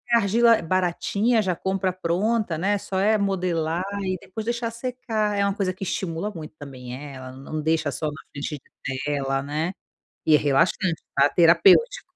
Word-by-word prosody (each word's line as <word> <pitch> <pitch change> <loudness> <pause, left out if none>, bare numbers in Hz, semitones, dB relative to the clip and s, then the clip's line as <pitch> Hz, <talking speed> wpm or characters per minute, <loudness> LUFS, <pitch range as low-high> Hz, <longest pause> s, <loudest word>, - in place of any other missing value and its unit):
argila 230 +1 +4
baratinha, 185 +6 +1
já 185 -3 0
compra 190 +1 -1
pronta, 185 +1 0
né, 200 +4 +1
só 190 -1 -3
é 215 +3 +3
modelar, 180 -4 0 0.2
e 185 -1 -1
depois 215 +3 -7
deixar 235 0 -2
secar. 230 -3 -2
É 200 - +2
uma 200 - +1
coisa 190 -3 -1
que 185 - -8
estimula 180 +1 -3
muito 160 -6 -9
também, 130 -4 -8
eh, 140 +1 -8
ela 130 0 -8
não 135 +4 -6
deixa 160 +1 +1
só 155 - -3
na 150 -1 -6
frente 145 +1 -4
de 130 0 -7
tela, 135 -2 0
né. 150 +5 -2 0.6
E 155 - +5
é - - +7
relaxante, 165 +5 +1
tá. 140 +1 +5
Terapêutico. 185 - +4
185 Hz, 175 wpm, -24 LUFS, 155-205 Hz, 0.6 s, é